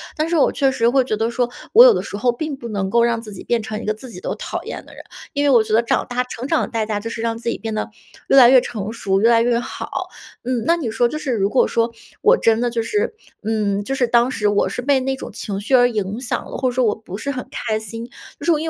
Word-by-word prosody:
但 310 +1 -1
是 340 - +1
我 - - +4
确 275 -1 +2
实 235 -3 +2
会 265 +1 +3
觉 215 -4 -2
得 225 +1 0
说， 240 0 -1 0.2
我 470 - +10
有 - - +8
的 - - -1
时 - - -7
候 240 +4 +1
并 295 +4 -4
不 235 -3 -8
能 200 -3 -2
够 235 +3 +3
让 235 -1 +1
自 215 -2 -10
己 190 - -9
变 235 -2 0
成 215 0 -5
一 - - -8
个 215 - 0
自 235 +4 -11
己 180 -5 -10
都 - - -3
讨 - - -5
厌 - - -7
的 - - -15
人， - - -11 0.3
因 285 - 0
为 285 - +3
我 240 -4 +6
觉 215 - -4
得 230 - +4
长 235 - 0
大 250 0 -1
成 250 +1 -7
长 325 -1 +2
的 - - -3
代 225 -2 -1
价 215 -1 -2
就 230 - -5
是 230 - -5
让 230 0 -1
自 235 0 -3
己 - - -2
变 225 -1 -5
得 215 - -3 0.4
越 275 - +5
来 245 -2 +9
越 255 -1 +7
成 215 -1 -5
熟、 195 -4 0
越 225 +3 +4
来 230 -1 +5
越 235 0 +2
好。 - - -5 0.4
嗯， 245 -2 -1
那 335 - +4
你 285 -9 -3
说 240 +2 +2
就 305 - -4
是 295 -3 -3
如 200 -3 +1
果 260 - +3
说 230 0 0 0.3
我 475 +3 +5
真 225 +1 +2
的 245 - +1
就 235 -1 -1
是， 430 - -1 0.3
嗯， 205 -2 0
就 265 - -3
是 250 -2 +1
当 235 +1 +3
时 210 -4 -1
我 205 0 +2
是 - - -4
被 270 +1 +2
那 265 +1 -1
种 265 - -8
情 200 -2 -5
绪 225 +6 -4
而 245 -1 +5
影 210 -1 -3
响 250 - -2
了， - - -7
或 260 -1 +1
者 245 - -5
说 250 -1 +2
我 210 - +2
不 205 -3 -9
是 280 +6 -3
很 255 -2 -6
开 220 -2 -2
心， 225 +2 -4 0.3
就 - - -7
是 345 - +4
因 325 - -2
235 Hz, 325 characters per minute, -20 LUFS, 220-260 Hz, 0.4 s, 我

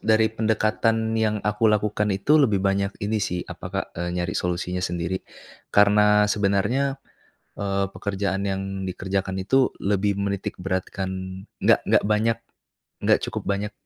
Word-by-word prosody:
dari 110 0 +4
pendekatan 110 0 +1
yang 110 -1 +1
aku 105 +1 +2
lakukan 105 0 +1
itu, 145 +11 +3
lebih 105 -9 +3
banyak 100 0 +1
ini 110 +1 0
sih 90 -2 -1
apa - - -8
Kak, - - -2
e - - -4 0.2
nyari 85 -1 -1
solusinya 90 +1 -2
sendiri. 90 0 -2 0.5
Karena 105 0 +5
sebenarnya, 105 +7 +1 0.6
eee, 100 -1 0
pekerjaan 100 0 -2
yang 95 -1 -1 0.2
dikerjakan 95 +1 -2
itu, 130 +6 +3
lebih 100 0 +1
menitik 100 -1 -2
beratkan 95 0 -2 0.5
nggak - - +4
nggak - - +3
banyak, 110 +2 +2 0.7
nggak - - +5
cukup - - -4
banyak 100 +1 -2
100 Hz, 140 wpm, -24 LUFS, 95-110 Hz, 0.7 s, Karena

